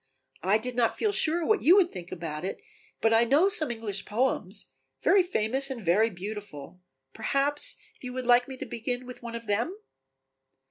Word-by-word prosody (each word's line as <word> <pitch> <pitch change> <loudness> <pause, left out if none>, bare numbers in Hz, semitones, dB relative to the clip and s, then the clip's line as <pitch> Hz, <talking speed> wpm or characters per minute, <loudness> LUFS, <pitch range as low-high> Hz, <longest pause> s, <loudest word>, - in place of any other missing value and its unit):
I 195 +3 +3
did 250 +2 -3
not 240 -2 +1
feel 430 - +1
sure 335 -3 +1
what 435 +4 +2
you 345 +5 +6
would 370 -3 +4
think 175 -1 -9
about 160 -3 -5
it, 190 - -4 0.4
but 225 0 +3
I 225 +1 +5
know 285 +10 +4
some 325 - +3
English 220 -4 -2
poems, 210 -4 -1 0.3
very 390 - +5
famous 270 - 0
and 240 -6 -6
very 205 +7 +3
beautiful, 185 -4 -8 0.3
perhaps 275 +6 0 0.2
you 250 - -7
would 255 -1 -4
like 245 0 +4
me 265 -1 -8
to 270 - -6
begin 245 +1 -4
with 250 0 -10
one 235 -1 -7
of 230 0 -7
them?" 235 - -1
235 Hz, 185 wpm, -27 LUFS, 210-275 Hz, 0.4 s, you